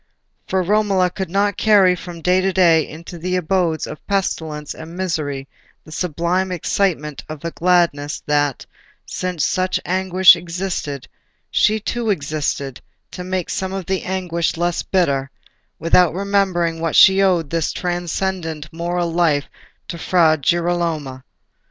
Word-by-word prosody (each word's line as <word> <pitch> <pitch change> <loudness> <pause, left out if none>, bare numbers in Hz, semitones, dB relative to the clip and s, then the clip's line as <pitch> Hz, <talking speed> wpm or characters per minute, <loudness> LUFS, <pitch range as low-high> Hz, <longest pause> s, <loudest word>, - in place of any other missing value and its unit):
For 190 -1 0
Romola 195 -2 +2
could 190 0 -4
not 200 +2 +1
carry 200 -4 +5
from 175 -2 -9
day 180 +2 +3
to 190 +1 +1
day 170 -4 +4
into 170 +2 -10
the 180 +2 -2
abodes 175 -2 0
of 150 - -9
pestilence 160 -7 -2
and 160 +2 -10
misery 150 -7 -3 0.4
the 155 - -15
sublime 180 +3 -1
excitement 165 -4 -1
of 155 +1 -8
a 170 - -2
gladness 170 -5 +1
that, 145 -2 0 0.4
since 180 -4 -2
such 185 0 0
anguish 185 0 +5
existed, 170 -5 -4 0.4
she 215 +1 +3
too 230 +2 -3
existed 145 -6 -2 0.3
to 180 - -7
make 185 -1 -3
some 190 0 -3
of 195 -2 -4
the 190 +1 -1
anguish 175 -3 -2
less 175 0 0
bitter, 140 -8 0 0.5
without 170 0 +3
remembering 185 -4 0
that 165 -2 -1
she 190 0 +7
owed 175 -6 +2
this 165 -1 0
transcendent 175 -3 -3
moral 170 0 -2
life 160 -5 +2 0.4
to 170 - -6
Fra 165 -2 +3
Girolamo. 165 -4 -1
175 Hz, 140 wpm, -20 LUFS, 160-185 Hz, 0.5 s, she